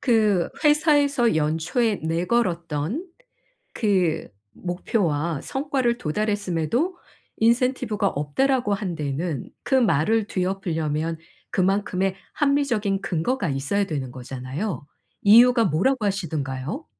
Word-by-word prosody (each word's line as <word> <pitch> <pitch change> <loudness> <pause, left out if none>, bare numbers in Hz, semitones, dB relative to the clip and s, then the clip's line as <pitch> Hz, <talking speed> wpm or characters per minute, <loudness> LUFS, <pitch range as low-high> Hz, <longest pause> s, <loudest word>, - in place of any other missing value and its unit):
그 215 -7 +2 0.2
회사에서 290 - +3
연초에 165 +9 +1
내걸었던 170 - -1 0.7
그 190 -7 +1 0.3
목표와 170 -4 -1
성과를 265 -4 -1
도달했음에도 210 - -1 0.4
"인센티브가 230 -3 +2
없다."라고 210 - 0
한 195 -4 -3
데에는 150 0 -3
그 270 - +1
말을 220 - +2
뒤엎으려면 165 -4 -2 0.3
그만큼의 195 0 +1 0.2
합리적인 245 -9 +1
근거가 180 - -1
있어야 140 +10 0
되는 140 -7 -4
거잖아요. 130 - -5 0.4
이유가 230 +2 +7
뭐라고 210 - +1
하시든가요? 150 -9 -3
195 Hz, 270 characters per minute, -24 LUFS, 160-235 Hz, 0.7 s, 이유가